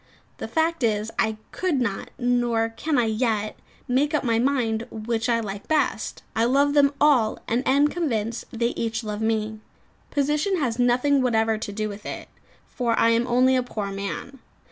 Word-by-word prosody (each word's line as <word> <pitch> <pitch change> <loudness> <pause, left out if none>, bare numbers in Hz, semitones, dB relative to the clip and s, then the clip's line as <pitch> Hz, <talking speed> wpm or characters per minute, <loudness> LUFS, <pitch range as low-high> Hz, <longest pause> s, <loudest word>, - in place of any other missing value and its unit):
The - - -4
fact 325 0 0
is, 215 -2 0
I 220 -1 +1
could 360 -7 0
not 230 -6 -2
nor 240 -2 +1
can 290 +6 -2
I 240 - +3
yet 220 -1 0 0.3
make 285 +5 +1
up 300 - 0
my 230 -3 +2
mind 235 -3 0
which 225 +1 -2
I 230 -1 +3
like 200 -2 -6
best. 310 -1 0
I 225 - +2
love 280 +3 +3
them 285 -1 +4
all, 260 -8 +4
and 235 +2 +1
am 280 +2 +4
convinced 235 -9 -2
they 235 0 0
each 230 -1 -3
love 210 0 -4
me. 220 -1 -1 0.5
Position 300 +7 +1
has 250 -6 -1
nothing 250 +3 +3
whatever 225 -3 +1
to 205 - -5
do 215 +1 -2
with 205 0 -8
it, - - -6 0.4
for 235 -2 -1
I 230 - +4
am 230 +1 +2
only 255 +2 +4
a 255 - +3
poor 210 -5 -4
man. 200 +7 -5
235 Hz, 180 wpm, -24 LUFS, 220-275 Hz, 0.5 s, them